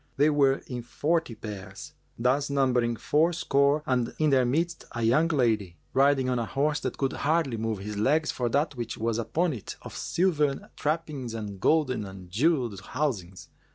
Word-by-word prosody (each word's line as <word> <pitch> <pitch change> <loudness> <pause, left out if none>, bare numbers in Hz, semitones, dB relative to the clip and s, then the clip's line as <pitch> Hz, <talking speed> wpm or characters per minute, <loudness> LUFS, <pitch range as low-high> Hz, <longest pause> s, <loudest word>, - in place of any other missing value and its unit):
They 150 +2 +4
were 140 -2 +3
in 125 -2 -5
forty 145 +2 -1
pairs, 100 -3 -8 0.2
thus 130 +5 +1
numbering 125 -4 +2
fourscore 150 0 +2
and 125 -2 0
in 155 -2 +2
their 130 -2 +4
midst 165 +7 -1
a 115 - -3
young 125 +9 +4
lady, 110 - +1 0.2
riding 135 -1 +3
on 125 -1 +1
a 115 - -1
horse 150 +2 0
that - - -4
could 135 -1 0
hardly 155 -4 +1
move 110 -1 -2
his 105 +2 -6
legs 150 +9 +2
for 120 -2 -1
that 145 +4 +1
which 120 -2 -5
was 115 0 -1
upon 160 +8 0
it 115 - -7
of - - -9
silvern 150 -6 0
trappings 150 -6 -2
and 105 -3 -6
golden 130 -3 +2
and 95 -2 -10
jewelled 120 - +1
housings. 100 -8 -3
130 Hz, 170 wpm, -27 LUFS, 115-150 Hz, 0.2 s, They